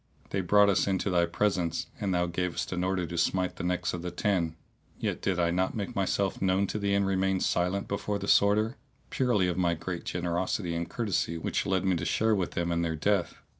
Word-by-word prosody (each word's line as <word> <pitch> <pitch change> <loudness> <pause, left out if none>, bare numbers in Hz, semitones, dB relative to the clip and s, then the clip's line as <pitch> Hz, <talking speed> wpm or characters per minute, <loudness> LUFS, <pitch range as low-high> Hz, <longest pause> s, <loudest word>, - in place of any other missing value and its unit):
They 100 - 0
brought 105 +3 +5
us 95 - +1
into 95 0 0
thy 85 -1 +3
presence, 90 -2 0
and 100 -2 -1
thou 90 -1 +2
gavest 90 0 -2
an 90 0 -1
order 90 -1 0
to 85 +1 -6
smite 90 +2 0
the - - -5
necks 90 0 -1
of 90 - -4
the 90 - -3
ten; 85 -3 0 0.4
yet - - -2
did 95 -2 0
I 85 -1 +2
not 95 +2 0
make 100 -3 -4
myself 100 0 0
known 95 +1 +2
to 105 - -2
thee 100 -1 +1
and 100 0 +2
remained 95 0 +1
silent 90 +3 0
before 100 +1 -2
the 100 - -5
Sworder, 110 +5 +3 0.3
purely 120 -8 +2
of 90 0 -1
my 85 -2 +2
great 85 +1 -5
generosity 90 +1 -1
and 85 +1 -3
courtesy 100 -7 -1
which 80 - -2
led 95 -1 +1
me 95 -1 +3
to - - -3
share 110 0 +2
with 95 -4 -1
them 85 0 -1
in 85 0 +1
their 80 -1 -1
death. 95 +2 0
95 Hz, 220 wpm, -29 LUFS, 85-100 Hz, 0.4 s, brought